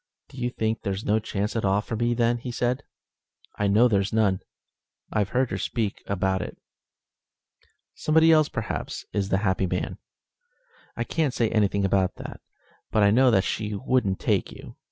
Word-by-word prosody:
"Do -, -, -14 dB
you 120 Hz, 0 st, 0 dB
think 110 Hz, -2 st, -2 dB
there's 100 Hz, 0 st, -3 dB
no 110 Hz, +1 st, +3 dB
chance 105 Hz, 0 st, -3 dB
at 115 Hz, -, -1 dB
all 100 Hz, +1 st, +3 dB
for 110 Hz, +2 st, -4 dB
me, 120 Hz, +1 st, +1 dB
then?" 120 Hz, 0 st, +2 dB
said 120 Hz, +1 st, 0 dB, 0.8 s
he. -, -, -1 dB
"I -, -, +3 dB
know 110 Hz, +5 st, +5 dB
there's 100 Hz, -3 st, +1 dB
none. 105 Hz, -4 st, +2 dB, 0.7 s
I've 105 Hz, -2 st, +1 dB
heard 125 Hz, +1 st, 0 dB
her -, -, -2 dB
speak 110 Hz, -5 st, -2 dB
about 95 Hz, -1 st, 0 dB
it." -, -, -6 dB, 1.4 s
"Somebody 160 Hz, +1 st, +4 dB
else, 155 Hz, -2 st, +5 dB
perhaps, -, -, -4 dB
is 100 Hz, -2 st, -1 dB
the 95 Hz, -, +2 dB
happy 95 Hz, 0 st, +1 dB
man?" 90 Hz, +1 st, -3 dB, 1.0 s
"I -, -, 0 dB
can't 155 Hz, -6 st, -1 dB
say 115 Hz, -2 st, +1 dB
anything 100 Hz, -2 st, +2 dB
about 95 Hz, -1 st, +1 dB
that, -, -, -9 dB, 0.5 s
but 110 Hz, -, +2 dB
I 100 Hz, -, +5 dB
know 130 Hz, +4 st, +5 dB
that 95 Hz, -5 st, +3 dB
she 105 Hz, 0 st, -2 dB
wouldn't 115 Hz, -4 st, 0 dB
take -, -, 0 dB
you. -, -, -11 dB
105 Hz, 175 wpm, -25 LUFS, 100-120 Hz, 1.4 s, know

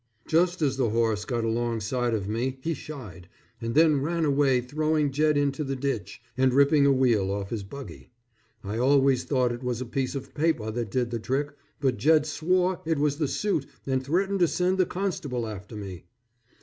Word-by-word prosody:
Just 175 Hz, +1 st, +2 dB
as 135 Hz, -2 st, +1 dB
the 125 Hz, -4 st, +1 dB
horse 110 Hz, -1 st, 0 dB
got 120 Hz, -2 st, -2 dB
along 115 Hz, 0 st, -1 dB
side 120 Hz, +2 st, 0 dB
of 100 Hz, -3 st, -3 dB
me 125 Hz, +5 st, -2 dB
he 165 Hz, -, 0 dB
shied, 105 Hz, -, -9 dB, 0.3 s
and 115 Hz, +2 st, -3 dB
then 155 Hz, -3 st, +5 dB
ran 165 Hz, +3 st, 0 dB
away 140 Hz, -3 st, +3 dB
throwing 150 Hz, +3 st, 0 dB
Jed 150 Hz, +2 st, +2 dB
into 145 Hz, +1 st, 0 dB
the 135 Hz, -1 st, -3 dB
ditch 135 Hz, -3 st, -4 dB
and 130 Hz, -1 st, +2 dB
ripping 140 Hz, +1 st, +5 dB
a -, -, +5 dB
wheel 120 Hz, -7 st, +2 dB
off 100 Hz, 0 st, -3 dB
his 115 Hz, -3 st, -2 dB
buggy. 135 Hz, +8 st, -10 dB, 0.5 s
I 105 Hz, +3 st, -3 dB
always 135 Hz, 0 st, +3 dB
thought 125 Hz, -3 st, +1 dB
it 120 Hz, +1 st, -5 dB
was 125 Hz, -2 st, -2 dB
a 130 Hz, -, -4 dB
piece 135 Hz, +2 st, -2 dB
of 135 Hz, 0 st, -6 dB
paper 145 Hz, -9 st, 0 dB
that 115 Hz, -1 st, -3 dB
did 120 Hz, +1 st, -1 dB
the 115 Hz, -, -2 dB
trick, 140 Hz, +5 st, -1 dB, 0.3 s
but 130 Hz, -3 st, +1 dB
Jed 155 Hz, 0 st, +4 dB
swore 180 Hz, +3 st, 0 dB
it 160 Hz, -1 st, 0 dB
was 145 Hz, 0 st, +1 dB
the 150 Hz, -2 st, 0 dB
suit 155 Hz, -3 st, -1 dB, 0.2 s
and 130 Hz, -1 st, 0 dB
threatened 190 Hz, +7 st, 0 dB
to 175 Hz, -, +5 dB
send 180 Hz, +3 st, 0 dB
the 185 Hz, -, +3 dB
constable 150 Hz, -11 st, -2 dB
after 105 Hz, 0 st, -8 dB
me. 95 Hz, -4 st, -7 dB
135 Hz, 200 wpm, -26 LUFS, 115-155 Hz, 0.5 s, then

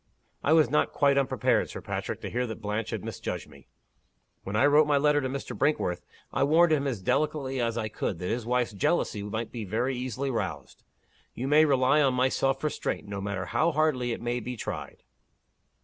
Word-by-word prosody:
"I 155 Hz, -, +3 dB
was 160 Hz, -2 st, +5 dB
not 150 Hz, -, +1 dB
quite 140 Hz, -1 st, +3 dB
unprepared, 135 Hz, -1 st, +1 dB
Sir -, -, -6 dB
Patrick, -, -, -4 dB
to -, -, -5 dB
hear 125 Hz, +1 st, -1 dB
that 110 Hz, -, -6 dB
Blanche 105 Hz, +1 st, -3 dB
had -, -, -4 dB
misjudged -, -, -5 dB
me. 70 Hz, -2 st, -17 dB, 0.8 s
When 95 Hz, -, -4 dB
I 110 Hz, -, +4 dB
wrote 150 Hz, +1 st, +5 dB
my 145 Hz, -1 st, +3 dB
letter 145 Hz, +1 st, +3 dB
to 130 Hz, -, -2 dB
Mr. 135 Hz, +1 st, -5 dB
Brinkworth, 140 Hz, -12 st, 0 dB, 0.3 s
I -, -, +2 dB
warned 160 Hz, +3 st, +5 dB
him 140 Hz, -2 st, +1 dB
as 115 Hz, -8 st, -3 dB
delicately 140 Hz, 0 st, 0 dB
as 115 Hz, -1 st, -1 dB
I 110 Hz, -2 st, -1 dB
could, 105 Hz, -3 st, -3 dB
that 90 Hz, -, -5 dB
his 120 Hz, +1 st, -1 dB
wife's 120 Hz, -1 st, 0 dB
jealousy 105 Hz, -, 0 dB
might 110 Hz, +3 st, -4 dB
be 115 Hz, -3 st, -5 dB
very 120 Hz, +7 st, -1 dB
easily 130 Hz, +2 st, -3 dB
roused. 115 Hz, -, -4 dB, 0.5 s
You 130 Hz, -, -3 dB
may 150 Hz, +2 st, +6 dB
rely 140 Hz, +1 st, +3 dB
on 135 Hz, -3 st, +3 dB
my 130 Hz, +1 st, +3 dB
self 135 Hz, +1 st, 0 dB
restraint, 150 Hz, -7 st, -2 dB
no 100 Hz, -1 st, -5 dB
matter 100 Hz, -2 st, -3 dB
how 160 Hz, -, +1 dB
hardly 145 Hz, -6 st, +1 dB
it 115 Hz, -, -4 dB
may 120 Hz, +1 st, -1 dB
be 125 Hz, +1 st, -6 dB
tried. -, -, -6 dB
130 Hz, 205 wpm, -28 LUFS, 110-145 Hz, 0.8 s, may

